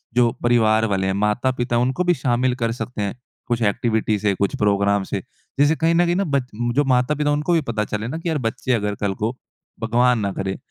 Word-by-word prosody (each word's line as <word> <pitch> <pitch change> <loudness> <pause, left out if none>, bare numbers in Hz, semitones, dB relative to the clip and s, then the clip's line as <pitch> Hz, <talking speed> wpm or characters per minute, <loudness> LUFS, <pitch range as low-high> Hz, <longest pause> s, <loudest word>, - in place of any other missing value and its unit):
जो 120 -1 +4
परिवार 110 -2 +3
वाले 95 -2 0
हैं, 95 - 0
माता-पिता 120 +5 0
है 120 - +3
उनको 130 +8 0
भी 175 0 +3
शामिल 125 -2 0
कर 115 -2 -1
सकते 120 -1 -5
हैं? 100 -1 -2 0.3
कुछ 120 -1 -1
एक्टिविटी 110 0 +1
से 100 0 +1
कुछ 100 +1 -1
प्रोग्राम 100 -1 +2
से? 95 0 -4 0.4
जैसे 145 +3 +4
कहीं 165 +1 +2
न 175 +1 +4
कहीं 175 0 +1
ना 195 - +1
बच 140 -7 -1 0.3
जो 145 - +4
माता-पिता 135 +3 +1
उनको 150 +4 0
भी 165 - +3
पता 110 -2 -1
चले 105 +2 -4
ना 135 - -4
कि 165 +1 -4
यार 160 - 0
बच्चे 125 +2 -2
अगर 105 -3 -1
कल 100 -1 0
को 110 +6 -2 0.4
भगवान 120 +2 +2
ना 100 -2 -1
करे 95 0 -3
120 Hz, 225 wpm, -21 LUFS, 105-130 Hz, 0.4 s, जो